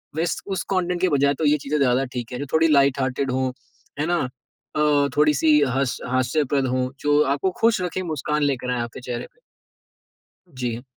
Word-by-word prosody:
वैस 165 +1 -1
उस 195 -2 -2
कंटेंट 180 -1 0
के 185 - +3
बजाए 140 -1 +3
तो 155 - 0
ये 150 +1 +4
चीज़ें 145 +1 -2
ज़्यादा 130 0 +2
ठीक 120 0 -4
है 125 - -4
जो 145 - -3
थोड़ी 160 +1 +4
लाइट 140 -3 +3
हार्टेड 130 0 -1
हो, 130 0 -1 0.5
है 150 - +1
ना? 175 0 +1 0.6
अ, 145 -2 +3
थोड़ी-सी 150 0 +4 0.2
हस 135 -2 0
हास्यप्रद 130 +2 +1
हो 130 0 -1
जो 145 0 +3
आपको 185 +6 -1
खुश 225 -4 +3
रखें 180 +1 -2
मुस्कान 150 -2 -2
लेकर 130 -3 -1
आएँ 125 -1 -1
आपके 120 +2 -6
चेहरे 120 -1 -5
पे। - - -33 1.1
जी। 125 -6 -4
140 Hz, 185 wpm, -23 LUFS, 130-155 Hz, 1.1 s, ये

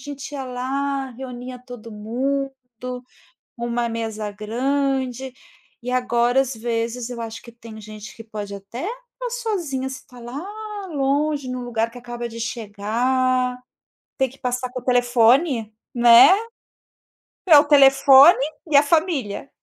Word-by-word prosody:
gente 280 -1 -8
ia 275 -2 -4
lá, 270 +2 -3
reunia 250 0 -8
todo 245 -2 -11
mundo, 265 +6 -2 1.0
uma 235 0 -2
mesa 220 -2 -4
grande". 260 +4 -2 0.5
E 250 - -4
agora, 245 0 +2
às 270 -1 -2
vezes, 230 +1 -3
eu 240 -1 -6
acho 225 0 -6
que 235 - -13
tem 230 -1 -12
gente 215 0 -10
que 225 - -10
pode 210 -2 -7
até 200 +6 -8
estar - - -8 0.2
sozinha, 275 -10 -2
você 265 0 -7
está 250 -3 -17
lá 240 +5 -7 0.5
longe, 285 -1 0
em 255 - -3
um 250 - -5
lugar 230 -1 -1
que 245 - -11
acaba 240 0 -6
de 230 0 -9
chegar. 250 +4 -1 0.6
Tem 265 -1 +1
que 265 - -17
passar 250 0 -2
com 255 - -5
o - - -21
telefone, 245 0 +3 0.2
né. 235 0 +8 1.2
É 325 -4 +8
o 290 - +5
telefone 275 +1 +7 0.3
e 290 - +5
a 280 - +8
família. 300 - 0
250 Hz, 145 wpm, -22 LUFS, 230-270 Hz, 1.2 s, né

